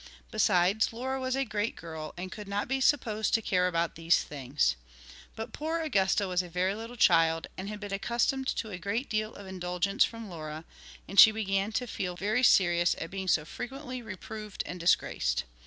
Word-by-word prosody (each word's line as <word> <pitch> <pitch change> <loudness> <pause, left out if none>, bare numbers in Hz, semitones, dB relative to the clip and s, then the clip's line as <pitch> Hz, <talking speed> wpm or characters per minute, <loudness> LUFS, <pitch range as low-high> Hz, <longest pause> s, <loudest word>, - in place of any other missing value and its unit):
Besides, 200 0 +3
Laura 260 +3 -3
was 260 0 -1
a 270 0 0
great 215 -1 -2
girl 160 -2 -7
and 185 +1 -6
could 210 -2 -8
not 200 +1 -2
be 265 +1 -1
supposed 225 -8 +2
to - - +3
care 180 -2 +2
about 170 -1 0
these 165 +1 +2
things. 135 - 0 0.6
But 225 - -6
poor 320 +2 -2
Augusta 200 -9 +1
was 180 -1 +1
a 180 - -9
very 180 +3 0
little 225 +3 -7
child 165 -6 +4
and 190 +2 -5
had 210 0 -6
been 205 -1 -6
accustomed 240 +6 0
to 220 -4 -2
a 180 - -6
great 215 +9 -3
deal 215 0 -1
of 200 - -10
indulgence 185 +1 0
from 230 -1 -4
Laura, 155 -3 -7 0.4
and 195 - +2
she - - +12
began 200 -1 -1
to 250 - 0
feel 180 -6 -4
very 210 +6 0
serious 175 -7 +4
at 165 - -5
being 190 -1 -4
so 155 -4 +2
frequently 255 - -6
reproved 215 0 -7
and 180 - -6
disgraced. 60 - +1
200 Hz, 190 wpm, -29 LUFS, 175-225 Hz, 0.6 s, she